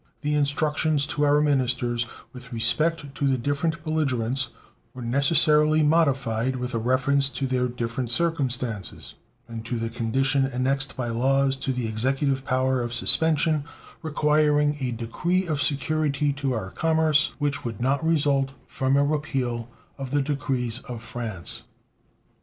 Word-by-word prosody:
The 150 -1 -1
instructions 150 0 +1
to 150 0 -1
our 145 +1 +4
ministers 125 -4 0 0.3
with 125 0 -11
respect 150 +5 +1
to 140 0 -1
the 135 -1 +2
different 145 +6 -1
belligerents 135 -5 0 0.5
were 125 - -7
necessarily 150 +4 +4
modified 135 -6 +1
with 125 0 -4
a 115 - 0
reference 135 +3 +2
to 140 - -3
their 130 -1 0
different 120 0 -3
circumstances, 125 - -1 0.3
and 115 -1 -7
to 120 - -2
the 115 0 -3
condition 135 +4 +1
annexed 135 +1 -1
by 120 -2 -2
law 135 +4 +2
to 135 0 -2
the 125 -3 -2
Executive 135 +4 0
power 130 0 +1
of 120 0 -3
suspension, 155 +2 +3 0.4
requiring 150 -1 +2
a 130 -2 -1
decree 145 +11 -1
of 155 -4 -1
security 145 0 0
to 140 -1 -2
our 100 -5 -4
commerce 160 -2 +2
which 145 -2 -1
would 115 -4 -5
not 135 +5 0
result 140 -4 +1
from 135 +1 0
a 140 - +3
repeal 130 -6 -2 0.3
of 135 -1 -5
the 145 +1 +1
decrees 135 -5 -2
of 120 -2 -7
France. 110 -8 -5
135 Hz, 145 wpm, -25 LUFS, 125-150 Hz, 0.5 s, our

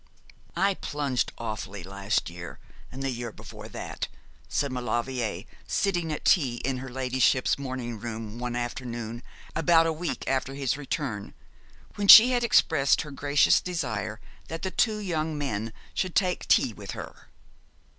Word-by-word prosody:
'I 195 +3 +3
plunged 140 -4 -1
awfully 105 -4 -5
last 100 +2 -1
year, 85 0 -8 0.3
and 135 +1 -6
the 135 - 0
year 120 -1 -4
before - - -11
that,' - - -5 0.4
said 140 -1 0
Maulevrier, 120 -2 -2 0.2
sitting 175 -5 0
at 150 - -5
tea 135 -9 +4
in 135 -1 0
her 130 +1 -6
ladyship's 130 +1 +1
morning 130 -4 -4
room 110 0 -6
one 120 0 -3
afternoon 120 -2 -4 0.3
about 165 0 +5
a 165 - +1
week 170 +2 -4
after 135 0 -1
his 135 -3 0
return, 140 -7 -4 0.6
when 205 -1 -1
she 230 +5 +11
had 245 -1 +1
expressed 160 -11 +4
her 150 - -9
gracious 145 +1 +3
desire 115 - -3 0.3
that 165 0 -6
the 190 - -1
two 215 +1 +2
young 160 -6 -2
men 115 -6 -2 0.2
should 185 -2 -2
take 185 -3 +1
tea - - +4
with - - -8
her. - - -9
130 Hz, 150 wpm, -27 LUFS, 120-160 Hz, 0.6 s, she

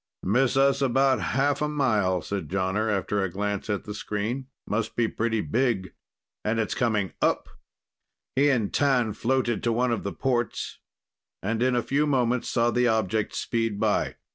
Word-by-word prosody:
"Miss 125 +7 +2
us 135 0 +3
about 135 0 +3
half 140 +1 +1
a 150 - +2
mile," 105 - +1
said 100 -1 -4
Jonner 95 +4 0
after 100 0 0
a 95 - 0
glance 100 +3 -3
at 100 -1 -1
the 105 - -6
screen. 110 +6 -3 0.2
"Must 110 +1 -2
be 115 -2 +2
pretty 110 0 -1
big... 115 -8 0 0.5
and 110 +2 0
it's 110 - 0
coming 110 -6 0
up!" - - +1 0.9
He 140 +2 +4
and 115 -7 +1
T'an 130 -6 +2
floated 120 -1 0
to 120 - +1
one 120 +2 +1
of 115 - -1
the 100 - -3
ports, 120 -1 -2 0.6
and 110 +3 -1
in 125 0 +3
a 120 - +1
few 145 +2 +1
moments 125 -3 +1
saw 120 0 +2
the 125 0 +2
object 110 -2 0
speed 115 -3 -1
by. - - +1
115 Hz, 170 wpm, -26 LUFS, 105-130 Hz, 0.9 s, He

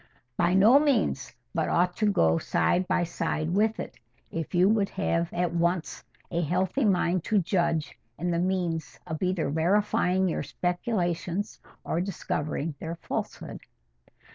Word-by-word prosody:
"By 175 +1 +2
no 220 +8 +7
means: 275 - +1 0.2
but - - 0
ought 180 +1 +2
to 210 -2 +2
go 80 - +3
side 175 - +1
by 180 - +2
side 165 -1 -2
with 215 +3 +2
it, - - -6 0.3
if 165 +2 -4
you 180 +2 +5
would 205 -2 +2
have 170 -3 -1
at 175 -1 -1
once 170 0 -1 0.3
a 170 0 0
healthy 185 - 0
mind 180 -3 +2
to 220 - +2
judge 170 -4 0 0.2
and 175 +2 -1
the 170 - +1
means 170 -9 -1
of 160 -1 -5
either 185 -4 0
verifying 185 +2 +2
your 175 - -1
speculations 180 +1 -2 0.2
or 170 - -1
discovering 160 -4 -3
their 165 +1 -4
falsehood." 170 - -5
175 Hz, 145 wpm, -27 LUFS, 165-190 Hz, 0.3 s, no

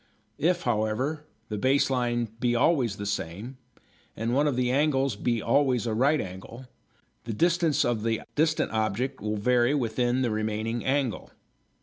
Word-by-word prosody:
If, 175 +3 +1
however, 125 +7 -1 0.2
the 105 -1 -3
base 135 +3 +2
line 120 -2 0
be 120 0 +1
always 125 -5 +2
the 105 - -6
same, 100 +6 -4 0.6
and 115 +2 -1
one 145 +3 +3
of 145 - 0
the 125 0 +1
angles 135 -3 +1
be 115 +2 -1
always 125 -1 +2
a 115 - -1
right 140 +7 +3
angle, 95 +7 -8 0.6
the 115 - -3
distance 170 - +2
of 115 -3 0
the 115 0 -1
distant 155 +1 +1
object 110 +5 -1
will 105 0 -2
vary 125 +5 +2
with 115 -6 -2
the 125 -1 +1
remaining 110 +2 -2
angle. 135 -4 -1
120 Hz, 155 wpm, -27 LUFS, 110-135 Hz, 0.6 s, one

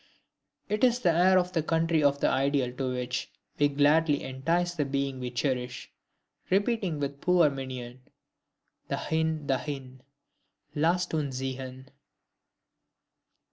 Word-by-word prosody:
It 210 +3 -2
is 245 -1 +5
the 175 - +4
air 185 +3 +5
of 180 0 +1
the 165 - +2
country 165 0 +1
of 140 0 +2
the - - +3
ideal 135 -2 +1
to 130 -2 -1
which 125 0 -3 0.3
we 145 - +5
gladly 145 +1 +3
entice 165 +7 -1
the 155 -4 0
being 140 -1 -2
we 125 -1 -3
cherish, 125 0 -3 0.6
repeating 195 -4 +1
with 140 0 -4
poor 175 -4 +4
Mignon: 130 -2 -7 0.9
DAHIN! 160 -1 -1
DAHIN!... 130 -1 -3 0.7
LASST 170 +4 +1
UNS 145 -4 -1
ZIEHN! 130 0 -6
145 Hz, 125 wpm, -28 LUFS, 130-165 Hz, 0.9 s, is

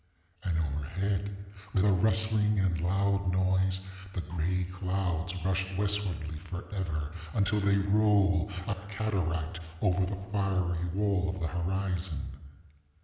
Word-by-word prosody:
And 90 -5 0
overhead, 95 +7 -2 0.3
with 95 0 +4
a 105 - +5
rustling 105 +2 +3
and 90 -4 +1
loud 100 +1 +2
noise, 95 0 +2 0.3
the 90 - -2
gray 90 +2 -1
clouds 90 -2 -1
rush 95 0 +1
westwardly 100 -6 -1
forever, 85 -3 -4 0.2
until 105 0 +3
they 100 0 +3
roll, 100 -1 +3 0.2
a 100 - +1 0.2
cataract, 90 -6 -1 0.2
over 95 0 +3
the 95 +1 -3
fiery 90 -4 +1
wall 95 -1 +1
of 95 +1 -3
the 85 - -1
horizon. 90 -2 -2
95 Hz, 120 wpm, -30 LUFS, 90-100 Hz, 0.3 s, a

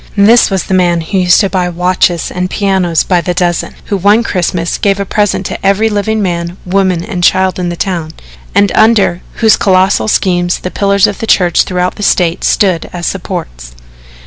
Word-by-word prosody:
This 220 +4 +5
was 190 -3 -1
the - - -4
man 175 -2 +2
who 190 +4 -2
used 180 -2 +4
to 200 - 0
buy 180 -1 -1
watches 180 -1 0
and 180 0 -3
pianos 190 -5 0
by 180 -2 +1
the 180 0 -3
dozen, 175 -1 -1
who 200 - -2
one 205 +5 +3
Xmas 175 -4 -2
gave 200 -1 0
a 200 - -2
present 205 +1 -1
to - - -6
every 200 +3 +2
living 210 +1 -1
man, 170 -1 -3
woman 185 -2 0
and 185 -4 -5
child 185 +1 +2
in 175 -1 -2
the 175 - -4
town, 170 -3 -3 0.5
and 200 0 +3
under 215 -5 +2 0.2
whose 220 - +5
colossal 190 +2 +2
schemes 175 -4 0
the 180 - -6
pillars 200 -1 +2
of 205 - -3
the 225 - -4
church 175 -5 +2
throughout 180 -1 -2
the - - -7
State 175 -4 +1
stood 185 -5 +1
as 175 -1 -6
supports. - - -6
185 Hz, 195 wpm, -11 LUFS, 175-200 Hz, 0.5 s, This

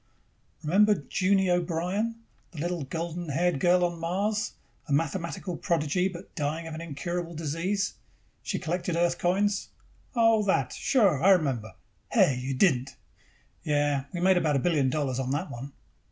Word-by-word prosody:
"Remember 205 +7 +4 0.2
Junie 190 -1 +2
O'Brien? 180 +6 0 0.4
The 160 - -8
little 175 0 -2
golden 170 +3 -4
haired 170 +1 +1
girl 180 +2 +4
on 175 -1 -3
Mars, 205 +5 -1 0.3
a - - -6
mathematical 165 +3 -1
prodigy, 170 +2 +1
but 185 0 -9
dying 155 +2 -2
of 160 - -6
an 160 - -6
incurable 170 +2 -4
disease? 165 +7 -1 0.5
She - - -3
collected 175 0 -2
Earth 170 0 +1
coins." 200 +3 +1 0.5
"Oh, 225 -2 +4
that. 195 - +1
Sure, 200 - +2
I 195 - +6
remember 135 - +2 0.4
Hey! 135 - +4
You 130 +2 -3
didn't!" 130 -4 +2 0.7
"Yes. 145 -2 0
We 175 - -4
made 185 0 +5
about 155 -4 +2
a 135 - 0
billion 150 -7 +3
dollars 135 -2 -1
on 130 -1 -2
that 155 +6 -2
one." 130 +4 -7
170 Hz, 155 wpm, -28 LUFS, 145-185 Hz, 0.7 s, I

